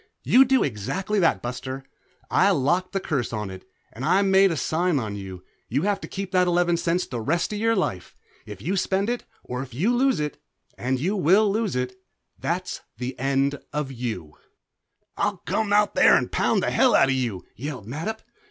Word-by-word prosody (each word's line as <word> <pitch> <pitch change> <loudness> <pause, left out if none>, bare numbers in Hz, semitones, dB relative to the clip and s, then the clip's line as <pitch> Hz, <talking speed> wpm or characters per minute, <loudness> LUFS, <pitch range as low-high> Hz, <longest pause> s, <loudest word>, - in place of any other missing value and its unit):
"You 265 +2 +6
do 265 +1 +3
exactly 190 - -2
that, 165 -3 +2
Buster. 130 +2 -5 0.5
I - - +4
locked 175 +8 +1
the 195 - -1
curse 140 -10 -2
on 105 -3 -4
it, 95 0 -11 0.2
and 120 - -7
I 195 +8 +3
made 195 0 +5
the 165 - -2
sign 165 +4 +1
on 110 -5 -3
you, 95 -2 -7
and 90 - -15 0.3
you 140 +7 0
have 205 0 0
to - - -6
keep 195 -1 -5
that 180 -1 +3
eleven 175 0 +2
cents 170 +1 0
the 120 -2 -5
rest 170 - 0
of 205 - -3
your 225 +1 +2
life. 90 - -2 0.3
If 105 -2 -9
you 180 +7 0
spend 195 +4 +1
it 245 - -4 0.2
or 125 +1 -4
if 130 -3 -9
you 210 - +2
lose 265 - +2
it, 150 -1 -4 0.3
and 130 +1 -1
you 185 +9 0
will 195 +3 +4
lose 215 - -1
it 125 0 -3 0.4
that's - - -3 0.2
the 125 +2 -4
end 140 +1 +1
of 150 -2 -3
you." 110 - -5 0.8
"I'll - - 0
come 220 -2 -1
out 205 0 +4
there - - +6
and - - 0
pound - - +1
the - - 0
hell 250 -4 +4
out 135 - +5
of - - +3
you!" 120 -8 -2
yelled 130 -3 -6
Mattup. 160 - -5
150 Hz, 205 wpm, -24 LUFS, 125-195 Hz, 0.8 s, You